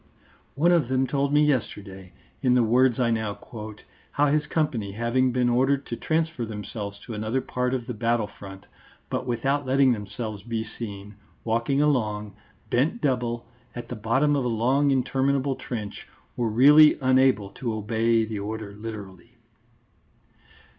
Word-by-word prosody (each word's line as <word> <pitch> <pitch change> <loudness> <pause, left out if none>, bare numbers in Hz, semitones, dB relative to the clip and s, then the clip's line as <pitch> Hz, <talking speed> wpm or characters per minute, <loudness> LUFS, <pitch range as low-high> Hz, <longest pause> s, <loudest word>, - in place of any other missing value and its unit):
One 165 +6 +3
of 165 -8 +3
them 130 +1 +1
told 140 +1 0
me 150 +1 +4
yesterday, 100 -9 -3 0.3
in 125 -2 +3
the 125 - +4
words 125 +2 +3
I 120 -2 +2
now 110 -3 -1
quote, 110 -2 -10 0.3
how 145 0 +2
his 150 0 +1
company 120 -11 -1
having 120 +4 +1
been 125 0 +1
ordered 135 +3 +2
to 120 - -4
transfer 160 -1 -1
themselves 105 -1 -6
to 120 - -8
another 110 +4 -1
part 125 0 -2
of 120 -2 -4
the 125 - -4
battle 115 0 0
front 95 -1 -12 0.5
but 130 - -2
without 135 +3 -1
letting 135 0 +4
themselves 110 -1 -4
be 115 0 -3
seen, 105 -2 -8 0.3
walking 115 +5 +1
along, 105 -8 0 0.4
bent 145 - +1
double, 120 - -1 0.3
at 120 - -7
the 125 - -4
bottom 130 +7 +1
of 140 - 0
a - - -1
long 125 +5 +2
interminable 135 +1 +1
trench 110 -6 -6 0.3
were 120 -2 0
really 145 +7 +7
unable 130 -6 +3
to 120 +3 -4
obey 110 +1 +1
the 110 -2 -5
order 105 0 -5
literally. 105 0 -9
120 Hz, 155 wpm, -25 LUFS, 110-135 Hz, 0.5 s, really